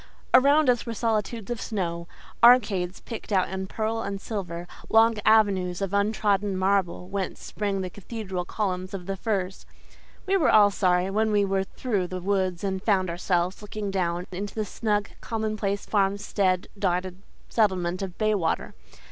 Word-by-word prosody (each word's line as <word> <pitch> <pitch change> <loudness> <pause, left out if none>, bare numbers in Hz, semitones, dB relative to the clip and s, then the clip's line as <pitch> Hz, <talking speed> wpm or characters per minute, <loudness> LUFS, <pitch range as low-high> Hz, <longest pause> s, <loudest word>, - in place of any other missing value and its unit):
Around 280 +3 +6
us 245 -1 +3
were 230 - -3
solitudes 225 0 -1
of 240 - -3
snow, 170 -5 -3 0.4
arcades 205 -7 +5
picked 230 -2 -8
out 190 -2 +2
in 190 0 -4
pearl 225 +2 -2
and 200 -2 -4
silver, 175 -5 -5 0.2
long 225 +1 +5
avenues 195 -5 +3
of 195 -1 -3
untrodden 205 -1 +1
marble 185 -2 0
whence 195 0 -3
sprang 200 -2 -2
the 185 - -3
cathedral 195 -2 -5
columns 185 -1 -3
of 180 -2 -7
the 195 +1 -3
firs. 195 -2 -3 0.6
We 390 0 +2
were 320 - +3
all 205 -1 +6
sorry 185 -1 +1
when 215 +2 +1
we 205 -1 +3
were 195 0 0
through 200 -5 -2
the 185 +1 -5
woods 185 -1 -1
and 190 -1 -1
found 190 -4 +1
ourselves 175 +1 -1
looking 210 -1 -5
down 175 -2 -1
into 195 +2 -5
the 215 -1 -1
snug, 205 0 -1
commonplace, 215 -3 -2
farmstead 200 -2 +1
dotted 185 -1 -1 0.3
settlement 185 -5 +1
of 190 -2 -5
Baywater. 210 -6 0
195 Hz, 155 wpm, -26 LUFS, 185-215 Hz, 0.6 s, Around